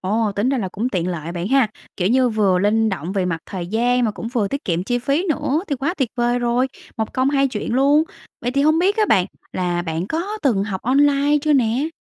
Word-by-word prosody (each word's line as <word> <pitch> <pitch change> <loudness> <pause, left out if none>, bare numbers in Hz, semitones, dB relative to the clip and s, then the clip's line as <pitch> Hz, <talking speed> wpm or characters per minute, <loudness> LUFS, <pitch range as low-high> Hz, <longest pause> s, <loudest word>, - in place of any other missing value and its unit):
Ồ, 210 +2 0
tính 205 +5 +1
ra 270 -1 +1
là 195 -5 -2
cũng 220 +7 -2
tiện 180 -6 -1
lợi 170 -1 -4
bạn 175 +2 -3
ha. 265 -3 +3 0.3
Kiểu 180 -1 +1
như, 255 +2 +3
vừa 205 -5 +2
linh 220 +3 +2
động 180 -2 -4
về 195 -2 0
mặt 165 -3 -2
thời 180 -3 -5
gian, 240 +5 +1
mà 220 - +1
cũng 225 +2 -6
vừa 230 -5 0
tiết 280 +5 -4
kiệm 175 0 -1
chi 245 +4 0
phí 280 +9 0
nữa, 305 +1 0
thì 285 - -1
quá 280 +7 -2
tuyệt 265 -9 -1
vời 240 0 +1
rồi, 240 +1 +1 0.3
một 220 -1 -3
công 260 +1 +2
hai 275 -1 +2
chuyện 225 -2 -4
luôn. 280 +3 +4 0.4
Vậy 245 - -1
thì 275 +2 +1
hông 310 +2 +4
biết 390 +4 +2
á, 435 - +3
bạn 180 -1 +4 0.3
là 175 -1 -1
bạn 165 +1 -3
có 380 - -3
từng 225 -9 +2
học 195 -3 -4
online 285 +3 +3
chưa 305 0 +2
nè? 255 +3 +2
240 Hz, 250 wpm, -20 LUFS, 195-275 Hz, 0.4 s, luôn